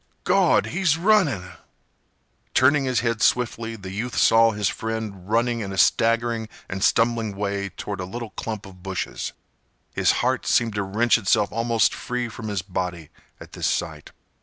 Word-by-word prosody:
"Gawd! - - +3
He's 175 -3 +2
runnin'!" 165 - +2 1.0
Turning 135 +1 +4
his 130 -2 +1
head 115 -2 -1
swiftly, 115 -2 +1
the 95 -3 -8
youth 115 +5 -4
saw 115 0 +5
his 105 -2 -1
friend 110 -3 -4
running 120 +1 +1
in 100 -3 -4
a 95 - -6
staggering 115 +1 +2 0.2
and 95 +1 -4
stumbling 115 -3 +2
way 100 0 -2
toward 100 +1 -6
a 90 - -3
little 115 +4 -7
clump 110 -3 -5
of 95 -2 -14
bushes. 95 0 -4 0.6
His - - +3
heart - - 0
seemed 115 -2 +2
to 105 - -1
wrench 110 +5 +2
itself 105 0 +2
almost 115 0 +2
free 125 -1 -3
from 110 0 -8
his 100 -4 -2
body 90 -4 -4 0.3
at - - -12
this - - -2
sight. - - -3
110 Hz, 160 wpm, -23 LUFS, 100-120 Hz, 1.0 s, saw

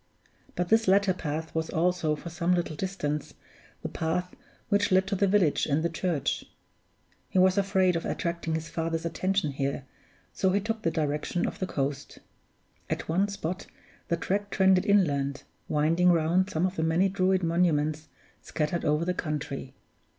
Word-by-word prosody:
But 180 -1 -1
this 225 -1 +4
latter 195 0 +4
path 160 -1 -4
was 160 0 -2
also, 170 -2 +1
for 170 +3 -8
some 175 +2 +1
little 170 -3 -2
distance, 150 -5 -3 0.5
the - - -1
path 180 +3 -2 0.3
which 205 -1 +2
led 190 +1 +4
to 200 +1 -1
the 200 +1 +2
village 185 -6 +2
and 150 +1 +1
the 170 - +1
church. 165 -4 -1 0.9
He - - -2
was 185 0 +5
afraid 190 -2 +2
of 165 - -1
attracting 170 -2 -2
his 160 0 -4
father's 165 0 -2
attention 185 -1 0
here, 140 0 -3 0.5
so 190 - +1
he 200 - +3
took 220 +2 -3
the 165 - +1
direction 150 +2 -1
of - - -4
the 185 - -2
coast. 140 -3 -3 0.7
At - - -3
one 185 +5 +2
spot 185 -2 -4 0.4
the 170 - 0
track 200 +4 -1
trended 190 -2 +3
inland, 145 -9 +2 0.2
winding 165 +4 +3
round 175 +3 +2
some 165 -1 0
of 185 +1 -3
the 160 - 0
many 165 +4 +3
Druid 190 -1 +1
monuments 155 -3 +1 0.3
scattered 155 +2 -2
over 150 +3 +1
the 180 - 0
country. 145 -5 -4
170 Hz, 165 wpm, -28 LUFS, 155-190 Hz, 0.9 s, was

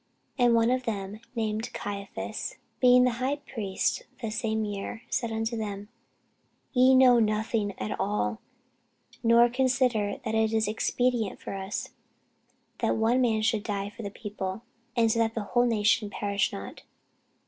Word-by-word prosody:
And 245 -3 +4
one 230 +1 +3
of 255 0 0
them, 205 -2 -4 0.2
named 220 0 -2
Caiaphas, 200 -1 -5 0.2
being 250 0 +6
the 245 -2 +1
high 270 +3 +1
priest 225 -9 -2 0.2
that 215 -1 -2
same 220 -1 -1
year, 205 +2 -5
said 235 -3 -1
unto 225 +1 -2
them, 205 -2 -5 0.8
Ye 260 0 +6
know 255 -2 +7
nothing 215 -2 0
at 105 0 -4
all, 105 +1 -1 0.8
nor 235 +1 +6
consider 250 -4 +1
that 220 - -2
it 220 0 +2
is 220 -1 +2
expedient 225 0 0
for - - -6
us, 195 +1 -4 0.9
that - - +1
one 230 +3 +3
man 220 -3 +2
should 220 -1 +2
die 200 -1 -3
for 220 - -10
the 200 - -4
people, 200 0 -5 0.3
and 230 -2 +3
that 225 0 +1
the 225 - -2
whole 240 +4 +2
nation 215 -1 +2
perish 200 -1 -1
not. 100 - -8
220 Hz, 150 wpm, -28 LUFS, 205-240 Hz, 0.9 s, know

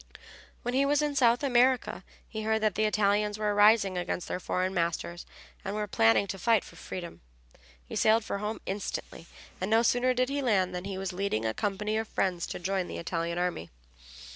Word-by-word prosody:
When 245 - -2
he 270 +2 +3
was 290 +1 +2
in 295 -1 -1
South 245 -1 +3
America 255 -1 +2 0.2
he 220 - -5
heard 220 0 0
that 215 -2 +2
the 215 +3 +1
Italians 210 0 +1
were 210 -1 0
rising 205 -3 +4
against 175 0 -3
their - - -3
foreign 185 +1 -1
masters 170 0 -2 0.4
and 195 - -4
were 210 0 -1
planning 115 - +3
to 195 0 -6
fight 225 +2 +3
for - - -14
freedom. 175 -2 -7 0.6
He - - -8
sailed 220 0 +3
for 200 - -3
home 210 +2 -3
instantly, 190 -3 -5 0.3
and 185 - -1
no 225 +1 +4
sooner 250 +1 +2
did 255 +1 +1
he 285 +1 -1
land 190 -8 +1
than 180 +1 -5
he 195 -1 -4
was 190 -1 -4
leading 180 - -1
a 110 - 0
company 210 - -1
of 220 0 -2
friends 180 -5 -1
to - - -5
join 185 0 -2
the - - -6
Italian 170 0 -3
army. 175 - -2
205 Hz, 200 wpm, -29 LUFS, 180-225 Hz, 0.6 s, rising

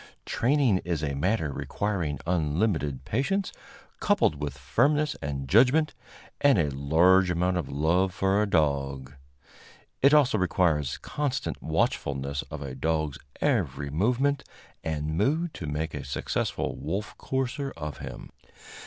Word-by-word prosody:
Training 130 -6 +2
is 85 -4 -3
a 70 -2 -1
matter 80 +2 0
requiring 90 -7 -2
unlimited 80 -4 0
patience, 185 - -1 0.5
coupled 75 -1 +2
with 70 -2 -4
firmness 140 - +1
and 70 -1 -4
judgment, 130 - +4 0.5
and 140 -2 +5
a 75 -5 +1
large 85 +7 +4
amount 90 +1 +1
of 90 - -2
love 85 +7 +2
for 95 +2 +1
a 105 - 0
dog. 70 -5 0 0.9
It 140 - +6
also 140 -8 +4
requires 80 -6 +1
constant 145 -3 -3
watchfulness 70 0 -1
of 75 -1 -6
a 70 -2 -6
dog's 80 +1 -1 0.2
every 70 -1 0
movement 125 - +1 0.4
and 80 -1 -2
mood 160 +4 +1
to 80 - -6
make 75 +2 -3
a 75 -2 -5
successful 70 - -2
wolf 105 +3 -4
courser 135 +1 -2
of 75 -4 -6
him. - - -8
85 Hz, 130 wpm, -27 LUFS, 75-120 Hz, 0.9 s, It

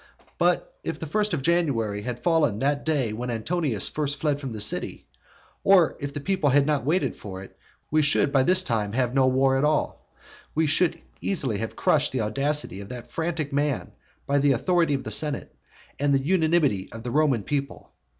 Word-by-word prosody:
But - - 0
if - - -3
the - - -6
first 210 +7 0
of 135 - -4
January 130 -12 +1
had 120 +2 -5
fallen 165 -8 +3
on - - -6
the 140 +5 +2
day 140 -6 -1
when 120 +3 -4
Antonius 120 - -1
first 145 -2 -3
fled 145 -1 0
from 135 -3 -5
the 110 - -6
city, 105 - -1 0.6
or 190 -4 +5
if 140 -1 -4
people 185 -5 +1
had 140 +1 +4
not 150 -2 0
waited 165 +8 0
for 95 -2 -8
it, - - -14 0.4
we 155 +1 +4
should 145 -1 +2
by 135 - +5
this 185 +6 +3
time 105 - -1
have 125 0 0
no 135 -1 +4
war 135 +1 +3
at - - 0
all. 150 0 -1
For - - -33 0.3
we 160 +1 +2
should 165 +2 +1 0.2
easily 135 - -1
have 110 0 -4
crushed - - +2
the 130 - 0
audacity 135 -2 -1
of 100 - -10
that 125 -2 -9
frantic 160 -3 -3
man 145 -2 -1 0.3
by 140 0 +2
the 140 0 +4
authority 165 +3 +2
of 135 - -4
the - - -5
senate 150 -2 -2 0.4
and 140 0 +2
the - - +3
unanimity 160 - +2
of 115 0 -9
the 120 - -4
Roman 140 -7 +2
people. 140 +4 -4
140 Hz, 200 wpm, -25 LUFS, 120-155 Hz, 0.6 s, or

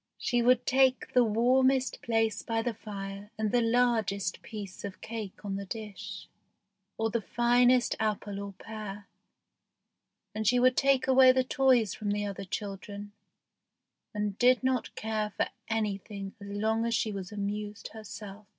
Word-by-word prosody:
She 245 -1 +1
would 250 +1 +4
take 260 0 +3
the 250 - +6
warmest 255 +4 +2
place 225 -1 +1
by 225 -1 -1
the 240 - -1
fire 200 -1 -7
and 215 -1 0
the 245 - +3
largest 225 -5 +1
piece 205 -4 -8
of 200 -2 -6
cake 215 -3 -7
on 195 -1 -2
the 200 - -5
dish, 215 -1 -7 0.7
or 225 0 0
the 235 - 0
finest 245 +2 +3
apple 210 -2 -2
or 200 0 -6
pear; 210 -1 -8 1.3
and 215 0 -2
she 250 +3 +5
would 255 +1 +4
take 275 -1 +3
away 260 -1 +7
the 260 0 +2
toys 255 -5 +3
from 210 -1 -4
the 205 0 0
other 200 -1 -5
children, 200 +1 -6 1.0
and 210 -1 -3
did 250 +1 +5
not 260 -2 0
care 215 -1 -2
for - - +1 0.2
anything 200 -2 -3
as 200 - -8
long 220 +2 0
as 230 0 +1
she 220 -2 0
was 195 -2 -6
amused 210 +1 -4
herself. 210 -1 -9
220 Hz, 155 wpm, -30 LUFS, 205-245 Hz, 1.3 s, away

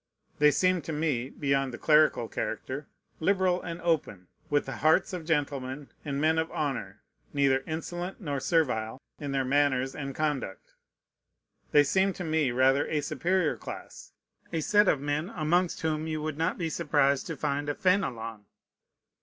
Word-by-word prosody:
They 150 0 +7
seemed 185 +2 +2
to 160 - -3
me, 145 -5 -1
beyond 140 -2 0
the 120 - -7
clerical 150 -6 +4
character, 135 +6 -4 0.3
liberal 185 0 +2
and 170 -1 -6
open, 145 - -1 0.2
with 145 0 +2
the 135 -2 -5
hearts 160 +6 +3
of 175 -3 -5
gentlemen 140 -3 -2
and 140 -2 -3
men 160 +2 +3
of 160 0 -2
honor, 135 -10 -3 0.3
neither 135 -2 +3
insolent 175 +3 -4
nor 145 -8 -3
servile 130 -6 0 0.2
in 145 -2 -4
their 135 -1 0
manners 135 -1 +2
and 135 -2 -5
conduct. 145 -10 -3 1.0
They 145 - +7
seemed 190 +6 +2
to 180 - -5
me 155 -4 +1
rather 130 +3 +3
a 150 - 0
superior 175 +2 0
class, - - -9 0.4
a 165 - -1
set 205 +5 +4
of 150 - +3
men 145 +5 -2
amongst 175 +2 +1
whom 155 0 -1
you 155 -1 -2
would 155 -1 -3
not 165 +4 0
be 165 -3 -2
surprised 145 -4 +2
to 165 - -5
find 145 +2 -1
a 145 - -1
Fénelon. 115 - 0
150 Hz, 160 wpm, -28 LUFS, 135-165 Hz, 1.0 s, They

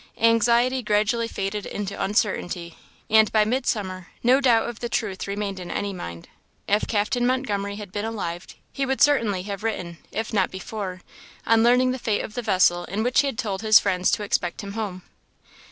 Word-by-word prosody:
Anxiety 235 +3 +3
gradually 215 +2 +1
faded 200 -1 -4
into 200 -1 -4
uncertainty; 185 -4 -1 0.3
and 220 0 +5
by 215 -1 +4
midsummer, 210 -7 -2 0.2
no 255 +3 +5
doubt 235 -4 +4
of 235 -2 -6
the 240 - -4
truth 200 -5 -2
remained 200 -1 -3
in 180 -1 -7
any 200 +3 -2
mind. 85 - -8 0.4
If 205 +1 +1
Captain 215 +3 0
Montgomery 210 -6 0
had 205 -2 -8
been 205 +1 -3
alive, 185 -6 -4 0.3
he 275 - -2
would 265 0 -1
certainly 225 -10 +3
have 200 0 -5
written, 180 -7 -3
if 220 0 -4
not 190 -3 +2
before, 190 -1 -6 0.4
on 225 0 +4
learning 250 +2 +4
the 255 - -4
fate 220 -3 0
of 210 - -7
the 245 - -3
vessel 180 -5 +3
in 205 +5 -2
which 245 +1 +2
he 285 - +3
had 270 - -4
told 200 -6 -2
his 215 -1 +7
friends 185 -2 +2
to 210 - 0
expect 180 -3 -1
him 200 -1 -7
home. 200 -5 -4
210 Hz, 185 wpm, -24 LUFS, 190-230 Hz, 0.4 s, his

